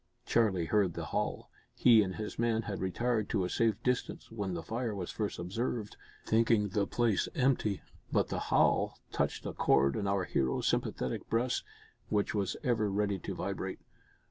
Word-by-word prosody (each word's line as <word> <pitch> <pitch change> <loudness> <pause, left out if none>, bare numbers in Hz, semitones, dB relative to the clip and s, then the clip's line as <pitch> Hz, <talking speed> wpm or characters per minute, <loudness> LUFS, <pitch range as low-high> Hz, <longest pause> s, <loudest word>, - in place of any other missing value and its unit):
Charlie 100 -7 +2
heard 95 -2 +2
the - - -4
howl. - - -2 0.2
He 115 -3 +6
and 95 -2 -2
his 110 0 -5
men 115 -1 +1
had 100 -2 -4
retired 110 +4 0
to 95 -4 +1
a - - -3
safe 115 -3 +2
distance 125 -2 -1
when 100 -5 -3
the 85 - -4
fire 115 -1 -2
was 90 -3 -4
first 105 -2 -3
observed 105 +4 -3 0.3
thinking 110 -2 +3
the 100 +1 0
place 115 -5 +1
empty 125 -6 +1 0.3
but - - +2
the - - -2
howl - - +3
touched - - -1
a - - -3
chord 70 0 +3
in 100 - -1
our 100 -1 +1
hero's 65 -7 0
sympathetic 65 - -1
breast, 120 +3 +1 0.5
which 105 -1 +1
was 100 -3 -1
ever 115 -6 +1
ready 100 -1 0
to - - -5
vibrate. - - -3
105 Hz, 170 wpm, -32 LUFS, 95-115 Hz, 0.5 s, He